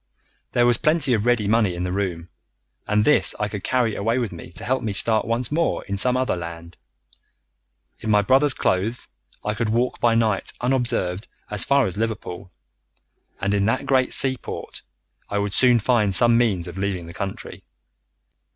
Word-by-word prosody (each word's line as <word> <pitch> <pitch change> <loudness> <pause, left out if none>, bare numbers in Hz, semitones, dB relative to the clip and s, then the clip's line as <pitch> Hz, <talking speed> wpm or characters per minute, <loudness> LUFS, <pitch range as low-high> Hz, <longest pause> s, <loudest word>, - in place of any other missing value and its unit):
There 120 - +3
was 120 -1 +3
plenty 155 -4 +2
of 110 0 0
ready 120 -4 +2
money 105 -4 +2
in 90 - -4
the 90 - -3
room, 90 -3 -3 0.6
and 105 +1 +2
this 150 - +4
I 105 - 0
could 105 -1 -7
carry 125 -4 0
away 115 +4 0
with 120 -5 -2
me 85 -1 -10
to 95 +6 -6
help 130 0 0
me 110 -4 -3
to 100 - +5
start 110 -1 +2
once 115 +2 -1
more 165 +2 0
in 100 - -3
some 125 +6 +1
other 130 -4 0
land. 85 0 -8 1.2
In 110 - -5
my 105 -1 +4
brother's 135 +5 +3
clothes 105 +6 -1 0.4
I 105 - 0
could 110 +1 -2
walk 120 +3 0
by 115 -1 +2
night 110 -4 0
unobserved 120 -7 -1 0.2
as 105 - +3
far 140 -2 +3
as 95 -1 -3
Liverpool, 100 -5 -4 0.9
and 100 +1 -1
in 100 -1 +1
that 115 - 0
great 130 -1 +2
seaport 130 -2 +1 0.5
I 105 - -2
would 100 -1 -2
soon 125 -2 +4
find 110 -4 +2
some 120 +2 +4
means 105 -8 +1
of 90 +2 -8
leaving 95 -3 -2
the 85 - -10
country. 95 +2 -6
110 Hz, 185 wpm, -22 LUFS, 100-120 Hz, 1.2 s, to